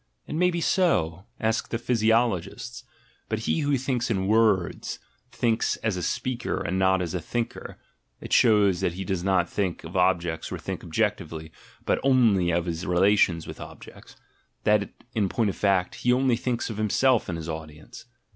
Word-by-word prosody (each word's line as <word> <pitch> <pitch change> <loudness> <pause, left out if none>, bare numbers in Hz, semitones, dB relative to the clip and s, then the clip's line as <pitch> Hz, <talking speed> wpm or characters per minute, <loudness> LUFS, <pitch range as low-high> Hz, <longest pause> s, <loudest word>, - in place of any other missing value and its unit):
It - - -7
may 180 +3 +3
be 170 -1 -2
so 95 - +1
— - - -40
ask 115 - -2
the 115 - -1
physiologists 115 -1 0 0.2
— 120 - -36
but 110 0 -2
he 135 - 0
who 145 -2 +1
thinks 125 -2 -1
in 95 -4 0
words, 105 -4 +1 0.3
thinks 115 -1 +1
as 110 -4 0
a 90 - -3
speaker 125 +6 -2
and 95 -1 -2
not 95 -1 +3
as 85 - -4
a 90 - -1
thinker 120 +7 -4 0.4
(it - - -6
shows 105 -6 +4
that 85 - 0
he 95 +2 -5
does 90 -1 -2
not 95 -2 +2
think 95 -2 -2
of 80 +3 -9
objects 90 -3 +1
or - - -3
think - - -6
objectively, 80 0 -2 0.3
but - - +1
only 115 -10 +3
of 85 0 +1
his 85 0 -3
rela 95 +4 +4
tions 85 -5 +2
with - - -9
objects - - -12 0.2
— - - -43
that, 105 -1 +2 0.2
in 105 -4 +1
point 110 -1 +1
of - - -11
fact, 95 -3 +1
he 125 - 0
only 130 -1 +3
thinks 120 -1 -2
of 105 - -7
himself 110 +3 +2
and 85 - -3
his 80 -1 -7
audience). 80 +9 -8
100 Hz, 190 wpm, -26 LUFS, 90-120 Hz, 0.4 s, shows